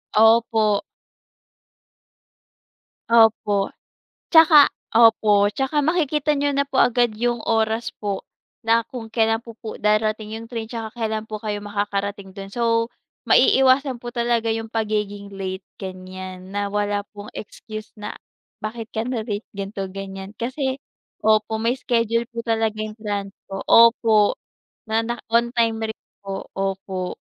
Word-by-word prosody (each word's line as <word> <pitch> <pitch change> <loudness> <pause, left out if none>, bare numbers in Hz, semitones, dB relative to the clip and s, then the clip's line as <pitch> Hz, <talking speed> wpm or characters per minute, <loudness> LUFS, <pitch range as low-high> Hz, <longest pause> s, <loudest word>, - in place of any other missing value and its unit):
Opo. 220 -1 +4 2.3
Opo, 220 -3 +4 0.6
tsaka 320 -3 +8 0.2
opo, 220 -3 +5
tsaka 270 +5 -1
makikita 300 -2 +1
niyo 285 0 +1
na 280 - +2
po 270 -1 +3
agad 240 -2 +2
yung 240 +2 0
oras 225 0 +1
po, 200 -2 -3 0.4
na 230 +1 +4
kung 240 -3 -7
kailan 225 -1 +2
po 230 -2 -11
po 220 - -7
darating 215 0 0
yung 225 +1 -7
train 230 -2 -4
tsaka 225 -1 -5
kailan 220 -1 -2
po 215 -1 -4
kayo 210 -1 -3
makakarating 200 -1 -3
'don. 195 0 -8
So, 230 +1 +1 0.4
maiiwasan 265 -1 +4
po 240 - -5
talaga 235 -2 0
yung 225 0 -3
pagiging 210 -2 -2
late, 190 -1 -5 0.2
ganiyan 185 -1 -8
na 205 +1 -1
wala 205 0 -1
pong 205 0 -9
excuse 215 0 -8
na, 210 -1 -7 0.4
bakit 225 +1 -6
ka 220 +1 -3
na-late 225 -4 -3
ganito, 195 0 -4
ganiyan, 195 +1 -8
kasi 260 +3 -2 0.4
opo, 215 0 +3
may 240 +3 +1
schedule 230 -1 0
po 235 0 -5
talaga 225 -1 0
yung 215 +1 -7
transpo. 200 -2 -5
Opo, 230 -2 +6 0.5
na 220 +1 +1
na 235 +1 -3 0.2
on 235 0 +4
time 225 -2 +1
rin 220 - -7 0.2
po, 195 -1 -5
opo. 190 -1 -3
220 Hz, 135 wpm, -22 LUFS, 205-235 Hz, 2.3 s, tsaka